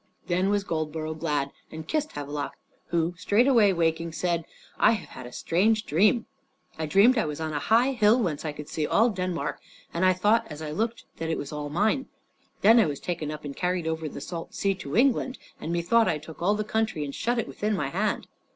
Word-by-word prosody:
Then 185 +2 +1
was 205 -1 +1
Goldborough 155 -2 -3
glad, 145 -3 -1 0.2
and 160 0 -8
kissed 305 -1 -1
Havelok, 145 0 -4 0.3
who, 170 0 0
straightway 220 +2 +4
waking, 165 -1 0
said, 170 0 -1 0.3
"I - - +6
have 210 - -5
had 130 - -9
a - - -11
strange 215 - +1
dream. 210 - +3 0.5
I 160 -1 -3
dreamed 220 +10 +5
I - - +1
was 150 0 -4
on 160 -1 -3
a 145 - 0
high 235 - +3
hill, 230 -1 +4
whence 170 -10 -1
I 155 - -2
could 150 0 -9
see 155 -2 -2
all 230 +3 +4
Denmark; 185 -3 -3 0.3
and 170 - -1
I 185 0 +5
thought 215 +5 +2
as 150 - -7
I 155 -1 -5
looked 225 +8 -2
that 160 0 -3
it 160 - 0
was 145 - -5
all 150 -1 -4
mine. 215 - +1 0.5
Then 225 +3 +7
I 215 - +4
was 145 -2 -4
taken 170 -4 -3
up 150 0 -6
and 140 -1 -6
carried 180 -1 -1
over 160 -1 -2
the 140 - -8
salt 165 +2 -6
sea 195 0 +1
to 175 -3 -5
England, 260 0 +2 0.2
and 165 - -4
methought 180 +7 +3
I - - +1
took 155 +2 -12
all 200 +4 +3
the 215 - -1
country 215 -7 -1
and 140 - -6
shut 240 - -1
it 230 - -1
within 210 0 -1
my 145 -7 -1
hand." 200 +8 -1
175 Hz, 220 wpm, -27 LUFS, 155-215 Hz, 0.5 s, Then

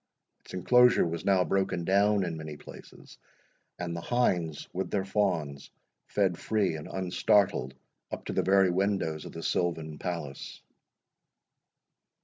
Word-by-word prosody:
Its - - -11
enclosure 125 +6 +5
was 85 0 -4
now 95 -2 +4
broken 95 -2 -1
down 100 +2 +3
in 85 -2 -3
many 80 -1 -7
places, - - -14 0.6
and 85 -1 -4
the 85 - -4
hinds 90 - 0
with 95 +1 -3
their 95 -2 -1
fawns 90 -9 -1 0.4
fed 95 -4 0
free 100 -6 0
and 75 - -7
unstartled 95 - +1 0.4
up - - -6
to - - -4
the - - +2
very 95 -1 +4
windows 95 -5 -1
of - - -8
the 80 - -8
silvan 80 -3 -1
palace. 85 -7 -5
90 Hz, 135 wpm, -29 LUFS, 80-100 Hz, 0.6 s, enclosure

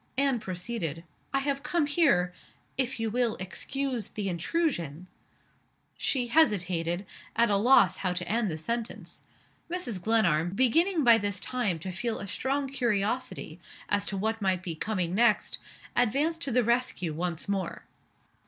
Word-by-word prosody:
Anne 275 -3 +3
proceeded. 180 -4 -4 0.3
"I 275 - +1
have 280 0 -1
come 300 +1 +1
here, 280 - +3 0.4
if 260 -2 0
you 225 -1 -1
will 240 -1 +1
excuse 240 +6 -3
the 205 -2 -4
intrusion 175 - -1 0.5
" - - -40 0.3
She 255 -3 +1
hesitated 185 - +2 0.3
at 235 -1 +3
a - - +4
loss 240 +7 +5
how 185 -2 -1
to 180 0 -3
end 225 -1 +1
the 155 - -3
sentence. 230 +8 -4 0.5
Mrs. 330 - -2
Glenarm, 180 -5 +2
beginning 320 - +3
by 235 -2 +7
this 205 -2 -2
time 235 -9 -1
to 185 +4 -6
feel 225 +5 -2
a - - -5
strong 270 +7 -1
curiosity 235 - -1 0.3
as 205 0 +1
to 195 - -2
what 220 +3 -1
might 190 -2 +1
be 175 -3 -3
coming 180 0 -1
next, 225 +1 +2 0.4
advanced 290 +8 +1
to 275 - 0
the 245 +1 +3
rescue 235 -8 0
once 170 +1 -2
more. 195 -3 -2
220 Hz, 155 wpm, -28 LUFS, 185-260 Hz, 0.5 s, by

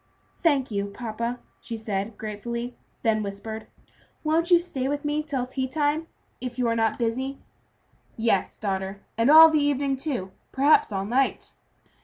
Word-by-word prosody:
"Thank 280 -8 +1
you, 200 -1 -1
papa," 235 +3 -4 0.2
she 230 - -6
said, 205 -1 -3
gratefully, 235 +3 -5 0.3
then 220 -2 +2
whispered, 215 +2 -6 0.6
"Won't 325 +2 +1
you 350 - +8
stay 285 -7 -3
with 290 +1 -2
me 295 +1 0
till 280 -5 -2
tea 260 +1 -2
time, 295 +3 0 0.3
if 250 -1 -6
you 250 -2 +1
are 230 - +1
not 225 -1 +1
busy?" 260 +4 -2 0.8
"Yes, 225 -4 +1
daughter, 195 -1 -3
and 230 +3 +2
all 320 +1 +10
the 310 - +3
evening, 280 -1 +1
too; 260 -10 -3 0.2
perhaps 275 -2 +4
all 195 -1 -2
night." 260 +5 0
245 Hz, 155 wpm, -26 LUFS, 220-285 Hz, 0.8 s, all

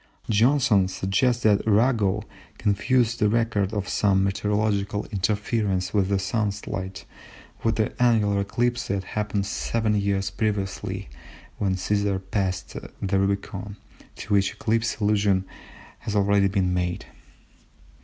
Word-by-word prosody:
Johnson 115 -3 +4
suggests 95 +6 0
that 105 -2 +4
Arago 105 -2 +2 0.3
confused 115 +3 +1
the 105 - +3
record 110 -3 +1
of 105 -2 -3
some 95 -2 +2
meteorological 100 +1 0
interference 100 -1 -1
with 100 -3 +2
the 100 - +2
Sun's 100 +1 -2
light 95 0 -5 0.6
with 115 0 +2
the 110 - 0
annular 105 -5 +3
eclipse 120 +4 -1
that 95 -1 -1
happened 105 0 -2
seven 110 +2 -1
years 100 -1 0
previously 100 - -2 0.5
when 95 -2 +1
Cæsar 100 +1 0
passed 95 -3 -2 0.2
the 95 0 0
Rubicon, 100 +1 -2 0.4
to 105 - -4
which 100 -1 +3
eclipse 115 +1 -1
allusion 100 -3 +2 0.5
has 105 - -4
already 100 -1 +3
been 95 -2 0
made. 90 0 -2
100 Hz, 125 wpm, -25 LUFS, 95-110 Hz, 0.6 s, Johnson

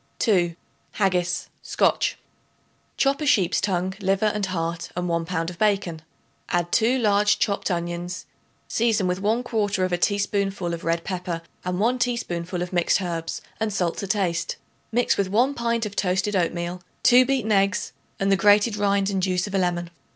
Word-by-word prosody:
2. 175 -7 +2 0.4
Haggis 180 -3 0
(SCOTCH). - - +1 0.8
Chop 275 +2 +2
a - - -1
sheep's 200 -11 +3
tongue, 185 -1 0
liver 195 +2 +1
and 210 -2 0
heart 165 -2 -3
and 180 0 -2
1 170 -1 0
pound 165 0 -2
of 175 - -13
bacon. 195 -6 +1 0.5
Add 175 0 0
2 235 +3 +3
large 210 -3 +3
chopped 200 0 0
onions; 175 0 -3 0.4
season 225 -4 +1
with 180 +1 -1
1/4 205 -5 0
teaspoonful 200 -3 0
of 170 - -5
red 165 0 0
pepper 180 -3 -4 0.2
and 180 0 -2
1 240 +4 +2
teaspoonful 180 -8 -2
of 180 - -7
mixed 175 +2 +2
herbs 165 -3 -4 0.2
and 220 -1 0
salt 180 -4 -1
to 200 - -4
taste. 180 -4 0 0.4
Mix 245 +2 +2
with 200 - +1
1 245 +8 +2
pint 235 -2 -1
of 205 -1 -6
toasted 195 +2 0
oatmeal, 175 0 -1 0.2
2 250 +1 +7
beaten 255 -4 0
eggs 195 -1 +1 0.3
and 195 0 +1
the - - +6
grated 210 +2 +4
rind 200 -1 +1
and 195 -1 0
juice 180 -1 0
of 200 - -8
a 195 - +2
lemon. 175 -1 -1
195 Hz, 165 wpm, -24 LUFS, 175-210 Hz, 0.8 s, 2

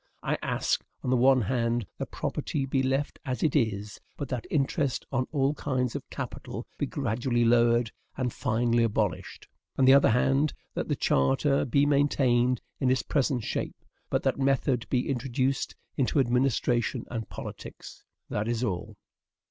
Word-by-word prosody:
I - - 0
ask, - - 0 0.2
on 125 - -1
the - - +4
one 130 +1 +5
hand, 120 0 0
that - - -4
property 140 -2 -2
be 135 0 0
left 135 +2 -1
as 130 -5 -3
it 155 - +2
is, 105 -6 -1 0.2
but 140 -3 -5
that 125 -3 -4
interest 140 -3 0
on 130 -1 0
all 140 -1 +2
kinds 130 -5 -1
of - - -6
capital - - -6
be - - 0
gradually 120 -1 0
lowered 120 0 +4 0.3
and 125 -3 -1
finally 120 +1 +1
abolished; 110 -4 -1 0.3
on 135 - +4
the 130 - +8
other 140 - +6
hand, 135 +5 +2 0.2
that - - -3
the - - 0
charter 135 - +2
be 140 +2 +3
maintained 130 -4 +2 0.2
in 130 - +2
its 130 0 +2
present 135 -4 0
shape, - - -3 0.3
but - - 0
that - - 0
method 135 -3 +1
be 125 -1 +1
introduced 130 0 -1 0.2
into 135 +2 +1
administration 125 -1 +1
and 115 -2 -4
politics. - - -9 0.2
That 105 +1 -2
is 120 +1 -1
all. 105 0 -3
125 Hz, 160 wpm, -28 LUFS, 120-135 Hz, 0.3 s, the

